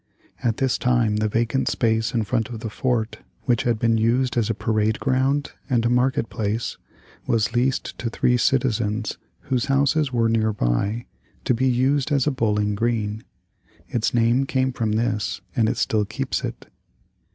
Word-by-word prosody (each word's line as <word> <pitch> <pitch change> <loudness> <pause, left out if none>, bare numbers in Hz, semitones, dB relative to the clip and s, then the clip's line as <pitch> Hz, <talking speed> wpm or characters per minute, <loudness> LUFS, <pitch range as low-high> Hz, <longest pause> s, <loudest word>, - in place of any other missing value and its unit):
At 115 -2 +1
this 135 -2 +1
time 120 -4 +2
the 110 0 +1
vacant 115 +4 0
space 110 -1 +1
in 115 -2 0
front 115 +1 -1
of 115 -3 -7
the 110 - -5
fort, 120 -2 -1 0.2
which 120 -4 +2
had 120 -2 +2
been 115 0 +2
used 125 +3 +1
as 115 -3 +1
a 115 - 0
parade 110 0 0
ground 135 +1 +1 0.2
and 120 -3 +2
a 120 - +2
market 125 -1 +2
place, 110 +2 -3 0.5
was 110 -2 +1
leased 130 +2 0
to 115 - -2
three 125 +2 +2
citizens 115 -4 0 0.2
whose 125 -3 -1
houses 140 +1 +2
were 115 -2 +2
nearby 110 - 0 0.4
to - - +3
be 130 +3 +1
used 135 +4 +1
as 140 -3 +2
a 150 - +2
Bowling 105 -5 0
Green. 110 0 -1 0.7
Its 115 -2 0
name 120 +3 +2
came 130 -1 +1
from 110 -3 -1
this 105 -4 -1
and 110 -2 +3
it - - -2
still 105 -2 +1
keeps 125 +6 -3
it. - - -5
115 Hz, 170 wpm, -23 LUFS, 110-130 Hz, 0.7 s, to